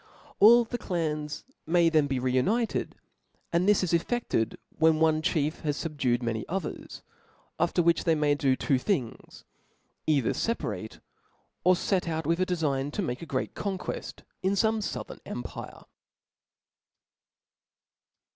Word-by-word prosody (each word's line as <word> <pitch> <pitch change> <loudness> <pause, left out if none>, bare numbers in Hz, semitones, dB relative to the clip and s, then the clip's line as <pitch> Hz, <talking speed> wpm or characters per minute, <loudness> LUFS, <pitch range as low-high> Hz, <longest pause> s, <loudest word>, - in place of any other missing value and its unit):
All 235 +3 +8
the 240 +1 -5
clans 155 -6 -3 0.2
may 170 +1 +4
then 155 -3 +3
be 135 -2 -1
re 125 0 0
united, 215 - 0 0.6
and 175 +4 +3
this 210 -2 +4
is 175 - -1
cfFefted 170 - 0 0.2
when 160 -1 +4
one 160 -1 +3
chief 155 -1 0
has 150 -2 -2
fubdued 135 -7 -1
many 115 -2 -1
others 180 -2 -5 0.6
•, - - +4
jifccr 175 - +1
which 170 0 +3
they 165 -2 +3
may 150 -1 +2
do 135 -2 +2
two 130 0 +1
things, 130 - -3 0.6
either 140 -6 +2
Ic 230 +1 -1
pa* - - -3
yate, 105 +2 -7 0.6
or 185 +1 +5
fet 180 0 0
out 160 -1 -2
with 165 +3 +1
a 185 - +1
defign 145 -6 -1
to 205 - -1
make 125 -6 -3
a 165 - -7
great 130 -2 -2
con 200 -2 -3
queft - - -6 0.2
in 190 +1 +1
fome 220 +2 +2
fouthern 210 - -5
empire. - - -7
160 Hz, 155 wpm, -28 LUFS, 140-185 Hz, 0.6 s, All